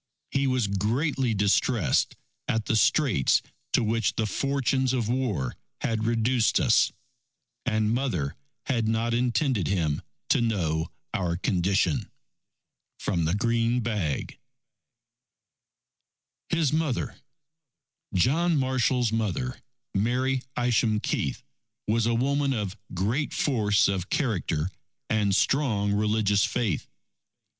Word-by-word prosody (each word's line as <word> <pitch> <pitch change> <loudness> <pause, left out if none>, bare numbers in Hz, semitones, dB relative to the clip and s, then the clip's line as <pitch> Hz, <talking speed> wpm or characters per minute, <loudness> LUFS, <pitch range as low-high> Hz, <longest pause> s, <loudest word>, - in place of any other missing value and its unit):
He 135 0 +1
was 130 -3 +1
greatly 115 - 0
distressed 100 - +2 0.3
at 110 -1 0
the - - +1
straits 125 - +3 0.3
to - - +3
which 115 -2 0
the 110 - 0
fortunes 135 +2 0
of 120 -4 0
war 115 - -1 0.3
had 110 -1 -1
reduced 115 +1 +2
us. 120 -4 +4 0.8
And 110 -2 +1
Mother 115 - -1 0.3
had 115 -5 0
not 115 +1 0
intended 120 - +1
him 80 -7 0 0.3
to - - +4
know 85 -8 0 0.2
our 85 -3 -1
condition. 90 -2 +1 0.9
From 85 -5 0
the 80 +4 +1
Green 115 +2 +1
Bag 105 - -2 2.1
HIS 160 -4 +1
MOTHER 155 -5 -1 0.9
John 155 - +2
Marshall's 130 -3 +1
mother, 115 +4 -2 0.3
Mary 125 +5 +1 0.2
Isham 115 -3 +2
Keith, - - -2 0.4
was 115 +1 +2
a 115 - +2
woman 140 +3 +1
of 105 -5 -3 0.2
great 110 - -1
force 105 -7 +2
of 95 -2 -2
character 95 - -1 0.4
and 105 -3 +2
strong 110 -7 +2
religious 105 -1 +2
faith. 110 -10 -1
115 Hz, 110 wpm, -26 LUFS, 100-130 Hz, 2.1 s, us